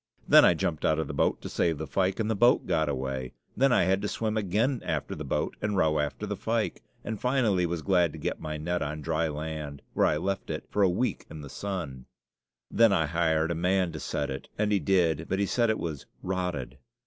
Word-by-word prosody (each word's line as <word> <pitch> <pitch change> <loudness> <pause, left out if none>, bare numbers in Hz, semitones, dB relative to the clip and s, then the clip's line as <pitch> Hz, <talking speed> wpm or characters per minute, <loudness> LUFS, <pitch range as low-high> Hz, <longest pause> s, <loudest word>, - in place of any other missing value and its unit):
Then - - +8
I - - +6
jumped 80 -3 -2
out 80 - +3
of 80 - 0
the 70 - -5
boat - - +1
to - - -4
save 80 -3 0
the 80 - -4
fyke, 95 +4 0
and 110 - 0
the 110 - +1
boat 120 +5 +4
got 80 -1 +1
away. 65 -2 -3 0.2
Then 135 +1 +3
I 120 - +4
had 95 +2 +2
to 105 - -1
swim 110 +1 -2
again 110 +6 0
after 80 -4 -2
the - - -6
boat - - -2
and 105 -1 -1
row 75 -3 +3
after 75 -1 -2
the - - -3
fyke, - - -1 0.2
and 110 -2 -5
finally 115 -9 +2
was 85 -2 -3
glad 90 -4 +3
to - - -8
get - - -3
my 75 0 -4
net 85 +3 -2
on 75 +1 -3
dry 80 +1 0
land, 75 -2 -5
where - - +3
I 75 - +1
left 95 +4 -3
it - - -4
for 105 - +1
a 95 - +5
week 120 +8 -1
in 80 -1 -8
the 70 - -9
sun. 85 -11 -5 0.6
Then 115 -1 +5
I 85 -5 +3
hired 80 0 +1
a - - +1
man 90 +1 +1
to - - -6
set 70 -1 -2
it, 65 - -7
and 105 0 +1
he 100 - +3
did, 80 -3 +1
but 95 - 0
he 100 - +1
said 115 +3 +1
it 110 - +1
was 80 -5 -5 0.2
"rotted." 90 -9 -3
85 Hz, 240 wpm, -28 LUFS, 75-100 Hz, 0.6 s, Then